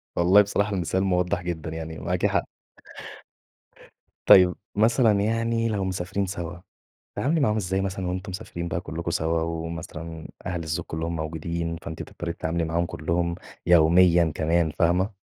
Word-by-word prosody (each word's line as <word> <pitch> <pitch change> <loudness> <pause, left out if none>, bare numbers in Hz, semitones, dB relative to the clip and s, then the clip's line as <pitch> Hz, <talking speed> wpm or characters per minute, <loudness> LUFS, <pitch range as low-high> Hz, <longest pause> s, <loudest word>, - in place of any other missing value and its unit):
والله 90 +4 +6
بصراحة 100 0 0
المثال 95 +1 0
موضح 90 -1 +1
جدًا، 85 -2 -4
يعني 80 0 -6
معاكِ - - -1
حق. - - +1 1.8
طيب 90 -1 +8 0.2
مثلًا 110 -1 +3
يعني 115 +2 0
لو 105 -3 -1
مسافرين 95 +1 -2
سوا، 85 -2 -5 0.6
بتتعاملي 160 +5 0
معاهم 110 -7 +2
إزاي 95 -2 -1
مثلًا 95 -1 -3
وأنتم 95 +3 -4
مسافرين 90 -3 -5
بقى 85 0 -2
كلكم 85 -1 -4
سوا، 80 0 0
ومثلًا 80 0 -5 0.2
أهل 90 -2 -3
الزوج 80 +1 -3
كلهم 80 +1 -3
موجودين، 85 +1 -3
فأنتِ 80 -1 -6
تضطري 85 -1 -6
تتعاملي 85 +1 -2
معاهم 85 +2 0
كلهم 85 0 -1 0.3
يوميًا 85 0 +5
كمان، 80 0 +1
فاهمة؟ 90 +5 +1
85 Hz, 140 wpm, -25 LUFS, 85-95 Hz, 1.8 s, طيب